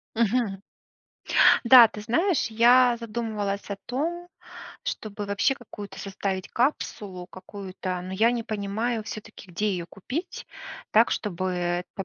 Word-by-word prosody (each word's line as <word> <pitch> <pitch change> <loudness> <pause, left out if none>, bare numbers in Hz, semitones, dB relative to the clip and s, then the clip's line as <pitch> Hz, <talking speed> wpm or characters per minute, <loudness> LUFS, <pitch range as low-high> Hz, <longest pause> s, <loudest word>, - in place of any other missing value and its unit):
Мгм. 225 -2 +1 1.1
Да, 235 -1 +10
ты 210 - -9
знаешь, 325 - +1
я 240 +2 +5
задумывалась 215 -3 -3
о 200 - -4
том, 335 +7 -3 0.6
чтобы 210 -1 -5
вообще 205 +7 +1
какую-то 205 -5 -10
составить 195 -1 -4
капсулу 205 -8 -2
какую-то, 185 -1 -6
но 185 +1 -7
я 225 +5 +3
не 235 -2 -2
понимаю 220 +2 -2
всё-таки, 210 -3 -9
где 205 +5 -1
ее 175 -2 -3
купить 265 - -6 0.5
так, 225 +2 +5
чтобы 185 -2 -2
это 180 +1 -3
210 Hz, 125 wpm, -26 LUFS, 195-235 Hz, 1.1 s, Да